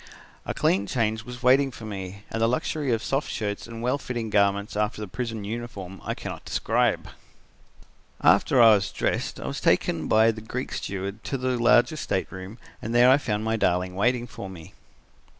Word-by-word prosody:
A - - -1
clean 100 +2 +2
change 110 -2 -1
was 125 0 -9
waiting 135 +2 +5
for 115 -3 -10
me, 100 -1 -7
and 115 - -2
the 115 - +4
luxury 135 +2 -1
of 115 0 0
soft 135 +2 -1
shirts 105 -3 -3
and 115 0 -7
well 125 +4 +1
fitting 120 -5 -4
garments 100 0 +2
after 105 +1 -1
the 105 - -5
prison 115 +1 -4
uniform 100 -4 -6
I - - -3
cannot - - -7
describe. - - 0 1.1
"After 130 - +4
I 115 -2 +9
was 100 -2 +1
dressed - - -2
I - - -6
was - - -4
taken 80 -2 +2
by 110 +1 +5
the 110 -1 -8
Greek 125 +4 -5
steward 100 +2 -4
to 135 - -2
the 130 0 0
larger 120 +4 +4
stateroom 95 -6 -4 0.2
and 115 +2 -3
there 120 +1 +7
I 135 - +5
found 105 -6 -2
my 110 0 0
darling 90 -2 +1
waiting 120 +5 +1
for 100 -4 -8
me." 85 -4 -11
110 Hz, 185 wpm, -25 LUFS, 100-120 Hz, 1.1 s, I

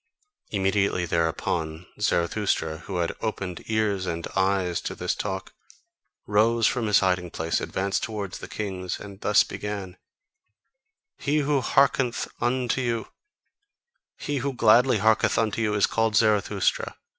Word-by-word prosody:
Immediately 95 -2 +1
thereupon, 80 0 -1
Zarathustra, 85 -4 0
who 95 - -4
had 85 -1 -1
opened 95 -5 -3
ears 105 -4 0
and 85 -1 -3
eyes 95 -2 +1
to - - -5
this - - -1
talk, - - -4 0.7
rose 110 +2 +3
from 120 -4 +1
his 105 -2 +4
hiding 90 -2 +1
place, 80 0 -1
advanced 95 +1 -1
towards 105 -4 -4
the - - -8
kings, 95 -4 -4
and 100 -1 -10
thus 105 - +5
began: 100 -3 -6 1.2
"He 145 +2 0
who 140 -1 +1
hearkeneth 135 -1 +2
unto 125 +1 0
you, 115 -3 -2 1.1
he 145 -1 -3
who 135 +1 -2
gladly 120 +1 +5
hearkeneth 110 +2 +3
unto 115 0 0
you, 105 -2 +1
is 105 - +4
called 115 -1 0
Zarathustra. 110 - +1
105 Hz, 135 wpm, -25 LUFS, 95-115 Hz, 1.2 s, thus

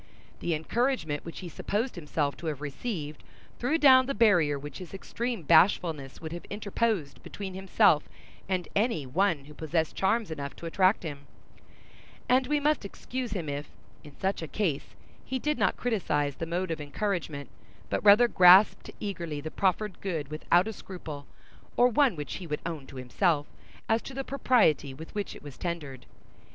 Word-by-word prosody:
The 170 - 0
encouragement 160 - -1
which 165 - -8
he 180 - -6
supposed 210 - -2
himself 150 -3 -2
to 165 - -6
have 150 -3 -2
received, 150 - -5 0.4
threw 270 +7 +1
down 260 -4 +7
the 275 - -2
barrier 175 -11 +4
which 140 0 -8
his 185 0 -9
extreme 230 +1 -4
bashfulness 155 -5 +3
would 160 -1 -7
have 170 +1 -6
interposed 205 -6 -2
between 195 -2 -7
himself 185 -5 +3 0.4
and 185 -2 -1
any 205 - +1
one 160 +1 +1
who 150 - -12
possessed 160 +1 -1
charms 210 0 +1
enough 140 -3 -5
to - - -10
attract 185 +4 +2
him; 145 -3 -7 1.0
and 255 0 +3
we 295 +1 +2
must 300 -2 +1
excuse 240 +3 -5
him 175 -6 -3
if, 145 +1 -4 0.3
in 145 -2 -14
such 195 -1 -1
a 160 - -4
case, 165 -6 -2 0.3
he 260 - -3
did 300 +3 -1
not - - +2
criticise 150 - 0
the 165 - -4
mode 175 +1 -2
of 160 -2 -3
encouragement, 150 - -3 0.4
but - - -1
rather 210 +4 +7
grasped 185 0 +6
eagerly 170 -7 -4
the 155 +2 -6
proffered 195 +1 0
good 160 -7 -3
without 170 +5 +2
a 220 - -4
scruple, 155 -8 -8 0.5
or 245 - +6
one 255 -3 +3
which 150 -3 -5
he 180 - -8
would 150 -1 -3
own 160 -5 -5
to - - -12
himself, 145 +5 +1 0.4
as 225 0 +2
to 270 - -9
the 270 - -2
propriety 230 - +2
with 160 +4 -10
which 205 -1 -4
it - - -13
was 145 -3 -10
tendered. 150 -7 -5
175 Hz, 175 wpm, -28 LUFS, 150-215 Hz, 1.0 s, down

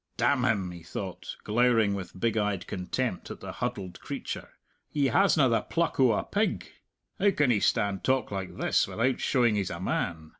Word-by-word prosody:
"Damn 130 -3 +2
him!" 100 -7 +1
he 85 -1 -9
thought, 95 +2 -6
glowering 115 -2 +3
with 95 -2 -6
big 115 +1 +1
eyed 105 -4 0
contempt 95 +4 -3
at - - -7
the - - -7
huddled 105 -7 -4
creature; - - -6 0.4
"he 140 -3 +1
hasna 165 -7 +4
the 115 -2 +2
pluck 170 -3 -1
o' 130 -4 +5
a - - 0
pig! 210 +2 -1 0.5
How 205 - +5
can 150 -9 +2
he 105 - +3
stand 100 -3 +1
talk 130 -4 +1
like 95 -2 -5
this - - +2
without 125 +3 0
showing 120 -4 +2
he's 100 -3 -1
a 85 - -5
man? 85 -3 -2
110 Hz, 185 wpm, -28 LUFS, 95-130 Hz, 0.5 s, o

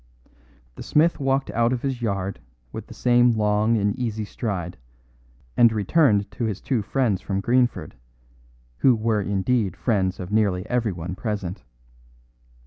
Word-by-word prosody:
The - - -11
smith 160 +3 +2
walked 135 0 0
out 115 +1 +1
of 125 -2 -2
his 135 -3 -2
yard 100 - -2 0.3
with - - -7
the - - -10
same 120 -1 +4
long 105 +2 +2
and 100 -1 0
easy 110 -3 -2
stride, 95 -5 -4 0.8
and 120 -1 +6
returned 105 - +2
to 120 - -3
his 105 -3 -3
two 125 -5 -1
friends 110 -2 0
from 95 -1 -2
Greenford, 120 +4 0 0.9
who 130 -3 +5
were 110 -1 0
indeed 100 0 0
friends 95 -6 0
of 90 +1 -6
nearly 100 -4 +1
everyone 95 -8 -2
present. 100 -2 -4
110 Hz, 140 wpm, -23 LUFS, 100-120 Hz, 0.9 s, and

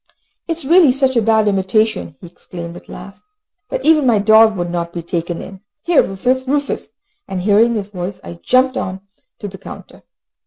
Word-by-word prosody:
"It 330 -2 -2
is 335 - -5
really 325 -3 +5
such 265 -1 +1
a 235 - +3
bad 220 -1 +2
imitation," 200 -2 0
he - - -12
exclaimed 170 0 -9
at - - -13
last, 195 +2 -11 0.5
"that - - -4
even 310 -4 +4
my 230 -3 +4
dog 220 +1 +5
would 175 -1 -3
not 170 -1 -3
be 170 - -5
taken 170 0 -4
in. 195 -1 -11 0.2
Here 345 -2 +4
Rufus! 255 +7 -1
Rufus!" 285 +1 -2 0.4
and 185 -2 -4
hearing 220 +4 +3
his 205 -2 -4
voice, 185 -1 -6
I 170 - -10
jumped 255 +1 +2
on 185 +1 -4 0.4
to 205 - -6
the 195 -1 -10
counter. - - -12
210 Hz, 190 wpm, -17 LUFS, 185-255 Hz, 0.5 s, really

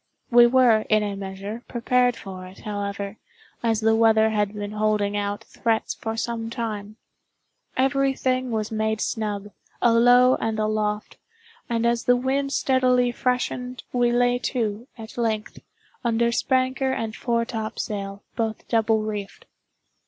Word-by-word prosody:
We 240 0 +8
were, 245 -3 +5
in 215 -1 +4
a 205 -1 -3
measure, 195 +3 -6
prepared 245 0 +2
for 185 -4 -8
it, 185 - -14
however, 200 0 -4 0.4
as 225 -2 +1
the 220 0 +4
weather 220 -1 +4
had 210 -2 +1
been 205 0 -4
holding 210 -1 0
out 205 0 -2
threats 225 -1 -1
for 225 0 -5
some 230 -1 -3
time. 215 -3 -4 0.8
Every 270 +1 +2
thing 255 -1 0
was 220 -2 -2
made 220 0 0
snug, 210 -2 -3 0.3
alow 245 +2 +5
and 225 -1 -1
aloft; 215 -1 -1 0.5
and 235 -1 0
as 235 0 +1
the 245 - +5
wind 270 +2 0
steadily 255 -2 +2
freshened, 250 0 -2
we 245 -1 +3
lay 245 0 +2
to, 230 -2 -2
at 225 +1 -9
length, 220 -2 -2 0.4
under 235 0 +2
spanker 260 +2 +1
and 225 -4 -3
foretopsail, 220 -4 -3
both 225 -2 -3
double 225 -1 +2
reefed. 210 -2 -5
225 Hz, 135 wpm, -24 LUFS, 210-245 Hz, 0.8 s, We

